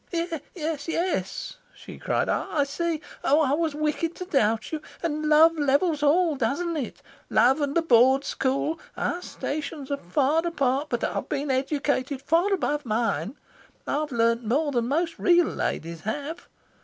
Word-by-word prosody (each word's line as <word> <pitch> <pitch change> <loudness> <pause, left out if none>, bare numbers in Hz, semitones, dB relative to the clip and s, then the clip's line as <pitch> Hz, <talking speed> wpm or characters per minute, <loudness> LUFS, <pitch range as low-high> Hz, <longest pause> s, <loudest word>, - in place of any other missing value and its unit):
"Yes, 310 -3 -3
yes," 330 - -2 0.2
she - - -11
cried. - - 0
"I 295 -3 0
see. 320 +3 -2 0.2
Oh 290 +3 +4
I 275 -4 +2
was 315 -1 0
wicked 305 +2 -1
to 365 - -6
doubt 225 - +1
you. 310 -1 -3 0.2
And 305 -2 -1
love 320 +2 +6
levels 290 +2 +2
all, 315 +2 +3
doesn't 285 +8 -1
it? 270 -8 -5 0.3
love 255 +7 +4
and 285 -1 -1
the 335 - +2
Board 265 -1 +5
school. 275 +5 -1 0.2
Our 350 - -1
stations 290 -4 -5
are 280 - 0
far 290 - +2
apart, 280 -4 0
but - - -2
I've - - -2
been 280 0 -1
educated 275 0 -1
far 340 +6 +2
above 295 -6 0
mine. 220 - -1 0.5
I've 300 +1 -1
learnt 230 0 +2
more 285 +7 +1
than 240 -3 0
most 330 +5 -1
real 350 -1 +5
ladies 165 - -3
have. 290 - -5
290 Hz, 155 wpm, -26 LUFS, 260-325 Hz, 0.5 s, love